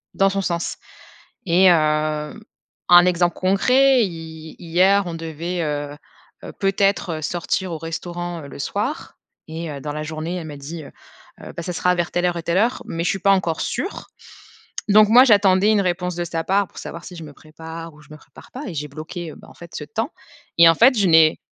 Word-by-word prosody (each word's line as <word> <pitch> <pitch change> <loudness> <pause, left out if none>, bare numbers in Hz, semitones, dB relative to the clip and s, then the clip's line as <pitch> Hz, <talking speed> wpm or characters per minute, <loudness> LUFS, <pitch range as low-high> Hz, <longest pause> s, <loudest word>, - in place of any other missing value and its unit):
dans 195 0 +3
son 195 - -1
sens 170 -2 -3 0.7
et 180 +2 +3
hem, 155 +1 +1 0.5
un 175 0 +8
exemple 175 -1 +1
concret, 250 +7 +3
hi 160 -3 -8
hier 185 +4 +3
on 170 - -5
devait, 165 +2 -5
heu 145 -1 -3 0.5
heu, - - -8
peut-être 195 -4 0
sortir 175 +2 -2
au 160 - -4
restaurant, 170 +1 -6
heu, 140 - -10
le - - -11
soir 210 - -4 0.3
et 160 0 -6
heu, 140 -1 -7
dans 150 +1 -5
la 150 - -4
journée, 160 +3 -5
elle 165 -3 -6
m'a 145 -2 -8
dit, 155 +4 -8
heu - - -12 0.5
heu: - - -9
«Bah, 170 - -4
ça 180 - -4
sera 180 +1 +1
vers 175 -1 -2
telle 175 0 0
heure 175 -1 -1
et 165 - -6
telle 170 +2 +1
heure, 235 +4 +1
mais 165 +1 -4
je - - +1
suis 195 - -2
pas 200 - +3
encore 175 -4 0
sûre». 385 - -4 0.8
Donc 210 +1 +6
moi 250 +3 +8
j'attendais 200 -3 +4
une 205 -2 +3
réponse 180 -1 -2
de 175 - -3
sa 165 -1 -3
part, 200 0 +1
pour - - -12
savoir 170 +1 -8
si 180 - -10
je 165 - -9
me 150 - -10
prépare 160 +2 -10
ou 150 - -18
je - - -21
me 155 - -10
prépare - - -18
pas 265 - -7
et 180 - -6
j'ai 150 0 -4
bloqué, 155 +3 -7
heu, - - -12
bah - - -16
en - - -15
fait 170 -1 -13
ce 150 - -5
temps, 225 - -3 0.5
et 170 0 +8
en 165 - +6
fait 245 +7 +5
je 200 - +2
n'ai 160 -2 +5
170 Hz, 220 wpm, -21 LUFS, 160-195 Hz, 0.8 s, un